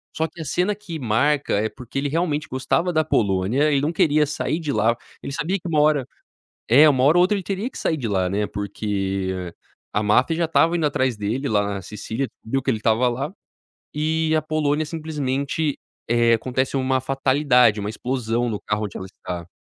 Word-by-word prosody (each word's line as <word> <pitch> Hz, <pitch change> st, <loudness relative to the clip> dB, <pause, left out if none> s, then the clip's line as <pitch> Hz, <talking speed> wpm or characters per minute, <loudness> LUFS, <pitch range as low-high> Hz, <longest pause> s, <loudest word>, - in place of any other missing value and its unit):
Só 160 Hz, -, 0 dB
que 165 Hz, -, -11 dB
a -, -, -5 dB
cena 180 Hz, +8 st, 0 dB
que 175 Hz, -6 st, -7 dB
marca, 135 Hz, +5 st, +1 dB
é 110 Hz, -, -1 dB
porque 125 Hz, +1 st, -9 dB
ele 140 Hz, +1 st, -1 dB
realmente 155 Hz, -1 st, -1 dB
gostava 165 Hz, +7 st, 0 dB
da 155 Hz, -2 st, +2 dB
Polônia, 110 Hz, +5 st, +1 dB
ele 140 Hz, -, +3 dB
não 150 Hz, +4 st, -1 dB
queria 155 Hz, -4 st, +3 dB
sair 150 Hz, +2 st, -2 dB
de 155 Hz, -4 st, -3 dB
lá. 115 Hz, +2 st, +2 dB, 0.3 s
Ele -, -, -5 dB
sabia 165 Hz, +5 st, -1 dB
que 175 Hz, -, -8 dB
uma 155 Hz, -3 st, +1 dB
hora 150 Hz, -3 st, +3 dB, 0.6 s
é, 145 Hz, +7 st, +7 dB
uma 130 Hz, -3 st, +3 dB
hora 155 Hz, +5 st, +5 dB
ou -, -, +6 dB
outra, 185 Hz, +3 st, +3 dB
ele 195 Hz, -, -3 dB
teria 195 Hz, +5 st, -3 dB
que -, -, -14 dB
sair 160 Hz, -, 0 dB
de 130 Hz, -6 st, -4 dB
lá, 95 Hz, -3 st, +1 dB
né, 105 Hz, +3 st, -1 dB
porque 95 Hz, -3 st, -3 dB, 0.4 s
a 105 Hz, -, +1 dB
máfia 125 Hz, +10 st, +3 dB
já 170 Hz, -, +1 dB
estava 165 Hz, +1 st, +3 dB
indo 160 Hz, -3 st, +1 dB
atrás 130 Hz, -4 st, 0 dB
dele, 110 Hz, +7 st, -2 dB
lá 105 Hz, -3 st, +2 dB
na 100 Hz, -1 st, -4 dB
Sicília, 110 Hz, +7 st, -4 dB, 0.2 s
viu 135 Hz, +4 st, -1 dB
que 135 Hz, -, 0 dB
ele 115 Hz, -, 0 dB
estava 115 Hz, +3 st, +2 dB
lá. 135 Hz, +7 st, -3 dB, 0.6 s
E 160 Hz, +1 st, 0 dB
a 155 Hz, -, +1 dB
Polônia 155 Hz, 0 st, 0 dB
simplesmente 150 Hz, -2 st, -2 dB, 0.3 s
eh, 120 Hz, 0 st, +3 dB
acontece 130 Hz, +4 st, -1 dB
uma 130 Hz, 0 st, +1 dB
fatalidade, 130 Hz, -3 st, +3 dB
uma 100 Hz, -, -3 dB
explosão 120 Hz, 0 st, -2 dB
no 105 Hz, -, -3 dB
carro 105 Hz, 0 st, -2 dB
onde 100 Hz, -, -9 dB
ela 95 Hz, -, -6 dB
está. 90 Hz, -2 st, -7 dB
135 Hz, 205 wpm, -22 LUFS, 110-155 Hz, 0.6 s, é